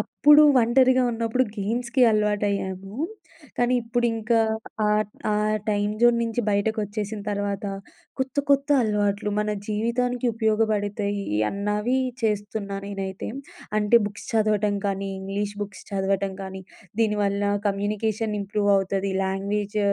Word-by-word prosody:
అప్పుడు 295 Hz, +1 st, +5 dB, 0.2 s
ఒంటరిగా 255 Hz, +2 st, +4 dB
ఉన్నప్పుడు 230 Hz, +2 st, 0 dB
గేమ్స్‌కి 235 Hz, +5 st, 0 dB
అలవాటయ్యాము. 205 Hz, -1 st, -1 dB, 0.6 s
కానీ 245 Hz, +1 st, +2 dB
ఇప్పుడింక 230 Hz, -1 st, -1 dB, 0.6 s
ఆహ్, 210 Hz, 0 st, +3 dB
ట్ -, -, -36 dB, 0.2 s
ఆ -, -, +2 dB, 0.4 s
టైమ్ 205 Hz, 0 st, 0 dB
జోన్ 240 Hz, 0 st, +5 dB
నుంచి 230 Hz, +1 st, -1 dB
బయటకొచ్చేసిన 210 Hz, 0 st, -1 dB
తర్వాత 205 Hz, 0 st, -2 dB, 0.5 s
కొత్త 265 Hz, +1 st, -3 dB
కొత్త 280 Hz, +1 st, +3 dB
అలవాట్లు 210 Hz, -1 st, 0 dB
మన 210 Hz, 0 st, 0 dB, 0.2 s
జీవితానికి 240 Hz, +3 st, 0 dB
ఉపయోగపడతాయి 210 Hz, -2 st, 0 dB, 0.2 s
అన్నవి 210 Hz, +5 st, 0 dB, 0.2 s
చేస్తున్నా 205 Hz, -2 st, -2 dB
నేనైతే. 195 Hz, -1 st, -5 dB, 0.5 s
అంటే 215 Hz, +3 st, +5 dB
బుక్స్ 205 Hz, 0 st, -8 dB
చదవటం 210 Hz, -2 st, +2 dB
కానీ 195 Hz, 0 st, -2 dB
ఇంగ్లీష్ 200 Hz, +2 st, -3 dB
బుక్స్ 205 Hz, -1 st, -8 dB
చదవటం 195 Hz, 0 st, -1 dB
కానీ, 190 Hz, 0 st, -7 dB, 0.4 s
దీని 210 Hz, -2 st, +2 dB
వల్ల 200 Hz, 0 st, 0 dB, 0.3 s
కమ్యూనికేషన్ 210 Hz, +2 st, -1 dB
ఇంప్రూవ్ 205 Hz, +1 st, 0 dB
అవుతది. 195 Hz, 0 st, -1 dB
లాంగ్వేజ్ 200 Hz, +2 st, -2 dB
210 Hz, 115 wpm, -24 LUFS, 200-225 Hz, 0.6 s, అప్పుడు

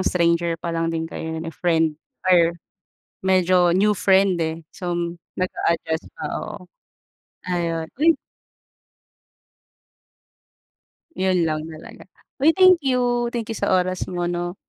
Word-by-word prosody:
stranger 170 Hz, -2 st, +1 dB
pa 170 Hz, +1 st, -5 dB
lang 165 Hz, 0 st, 0 dB
din 165 Hz, 0 st, -2 dB
kayo 160 Hz, 0 st, -5 dB
eh, 165 Hz, 0 st, -6 dB
friend 160 Hz, -3 st, +1 dB, 0.3 s
or 170 Hz, -2 st, +5 dB, 0.7 s
medyo 185 Hz, -2 st, +4 dB
new 205 Hz, +4 st, +3 dB
friend 190 Hz, -1 st, +3 dB
eh. 160 Hz, +1 st, -3 dB
So, 175 Hz, -1 st, -4 dB, 0.5 s
nag 185 Hz, 0 st, 0 dB
a-adjust 160 Hz, -1 st, 0 dB
pa, -, -, -5 dB, 0.2 s
oo. 210 Hz, -, -7 dB, 0.9 s
Ayun, 170 Hz, -2 st, -1 dB, 0.2 s
uy 330 Hz, 0 st, +6 dB, 3.0 s
'Yun 185 Hz, -3 st, +1 dB
lang 155 Hz, 0 st, -2 dB
talaga. 155 Hz, -, -11 dB, 0.4 s
Uy 320 Hz, -, +7 dB
thank 370 Hz, 0 st, +6 dB
you, 245 Hz, -2 st, +1 dB
thank 230 Hz, -2 st, -3 dB
you 225 Hz, -, -4 dB
sa -, -, -1 dB
oras 185 Hz, 0 st, +1 dB
mo, 175 Hz, -1 st, -1 dB
'no? 175 Hz, +1 st, -3 dB
175 Hz, 125 wpm, -22 LUFS, 165-190 Hz, 3.0 s, Uy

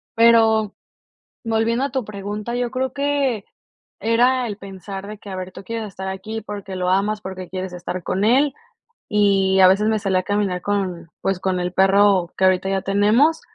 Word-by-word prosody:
Pero 225 Hz, -2 st, +4 dB, 0.7 s
volviendo 230 Hz, +3 st, +1 dB
a 280 Hz, -, -2 dB
tu 260 Hz, -4 st, -1 dB
pregunta, 210 Hz, +3 st, -5 dB
yo 245 Hz, -1 st, -1 dB
creo 260 Hz, 0 st, -2 dB
que 280 Hz, -6 st, 0 dB, 0.6 s
era 245 Hz, +3 st, +3 dB
el 205 Hz, -, -5 dB
pensar 195 Hz, 0 st, -8 dB
de 210 Hz, -1 st, -8 dB
que, 205 Hz, -, -13 dB
a 190 Hz, -, -5 dB
ver, 185 Hz, 0 st, -6 dB
tú -, -, -10 dB
quieres 225 Hz, 0 st, -4 dB
estar 190 Hz, 0 st, -7 dB
aquí 215 Hz, +4 st, -5 dB
porque 200 Hz, -2 st, -7 dB
lo 180 Hz, 0 st, -1 dB
amas, 205 Hz, +3 st, +1 dB
porque 185 Hz, -1 st, -7 dB
quieres 185 Hz, -1 st, -5 dB
estar 180 Hz, +1 st, -5 dB
con 185 Hz, +4 st, -1 dB
él. 270 Hz, +5 st, +3 dB, 0.5 s
Y 195 Hz, -2 st, +3 dB
a 185 Hz, -, +8 dB
veces 205 Hz, +3 st, +3 dB
me 220 Hz, -1 st, +2 dB
salía 190 Hz, -2 st, +1 dB
a -, -, -6 dB
caminar 205 Hz, -3 st, -1 dB
con, 185 Hz, -5 st, -2 dB
pues, 195 Hz, -1 st, 0 dB
con 185 Hz, -1 st, -1 dB
el 180 Hz, 0 st, -2 dB
perro 195 Hz, -2 st, +4 dB
que 190 Hz, -, +2 dB
ahorita 185 Hz, 0 st, +3 dB
ya 195 Hz, -1 st, 0 dB
tenemos, 215 Hz, -, +3 dB
205 Hz, 190 wpm, -21 LUFS, 190-225 Hz, 0.7 s, a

